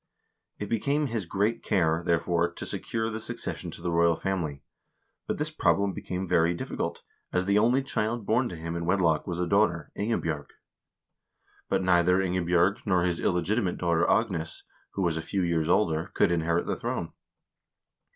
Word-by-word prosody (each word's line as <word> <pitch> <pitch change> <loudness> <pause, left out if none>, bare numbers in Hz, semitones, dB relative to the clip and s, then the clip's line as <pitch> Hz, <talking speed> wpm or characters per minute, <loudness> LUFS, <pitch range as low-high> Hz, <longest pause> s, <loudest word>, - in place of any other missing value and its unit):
It 105 - -4
became 140 +8 0
his 115 -8 -3
great 105 +5 0
care, 80 -4 +1
therefore, 85 0 +1
to - - -6
secure 115 0 -2
the 110 - -4
succession - - -4
to - - -8
the 85 - -1
royal 85 0 +4
family; 80 -7 -3 0.6
but - - -1
this - - -2
problem 100 -1 +2
became 95 +1 -4
very 85 +1 +3
difficult, - - -4 0.3
as 90 0 0
the 100 +1 +3
only 125 +5 +3
child 115 -4 -2
born 120 +4 +2
to 90 - -6
him 85 +1 -5
in 85 0 -3
wedlock 85 -4 +2
was 90 -1 -3
a 90 - +1
daughter, 100 +5 +1
Ingebj0rg. 85 -9 -2 1.2
But - - +1
neither 90 0 +4
Ingebj0rg, 90 +1 +2
nor 90 -3 +3
his 85 -2 0
illegitimate 90 +3 0
daughter 85 -1 +1
Agnes, 80 0 0 0.3
who 95 - 0
was 85 -2 +1
a - - -2
few 95 +3 -2
years 85 -2 0
older, 80 -4 +2
could - - +3
inherit 85 0 +1
the - - -1
throne. - - -3
90 Hz, 170 wpm, -27 LUFS, 85-100 Hz, 1.2 s, royal